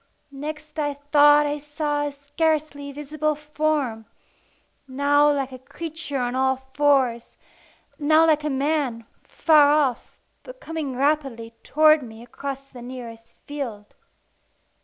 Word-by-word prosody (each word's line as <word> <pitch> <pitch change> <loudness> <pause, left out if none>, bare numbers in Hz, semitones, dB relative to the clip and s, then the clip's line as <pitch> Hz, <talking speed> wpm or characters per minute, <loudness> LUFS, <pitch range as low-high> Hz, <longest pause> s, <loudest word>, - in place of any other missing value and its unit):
Next 305 +2 -7
I 290 -1 -1
thought 290 +1 +5
I 295 0 -2
saw 295 0 -2
a - - -4
scarcely 285 0 -2
visible 300 +2 -2
form 295 -6 -2 0.8
now 285 +2 +3
like 275 -2 -2
a 255 - -9
creature 310 +2 -6
on 245 -1 -1
all 265 0 +2 0.2
fours, 265 -5 +1 0.6
now 310 +2 +4
like 305 -2 +3
a 300 - -1
man, 270 -4 -1 0.2
far 300 -3 +4
off, 290 -5 0 0.2
but - - -12
coming 315 - -5
rapidly 270 -5 -1
towards 310 +1 +4
me 225 -2 -10
across 275 +2 -7
the 255 -3 -12
nearest 235 -2 -10
field. 240 -8 -6
290 Hz, 125 wpm, -23 LUFS, 260-300 Hz, 0.8 s, thought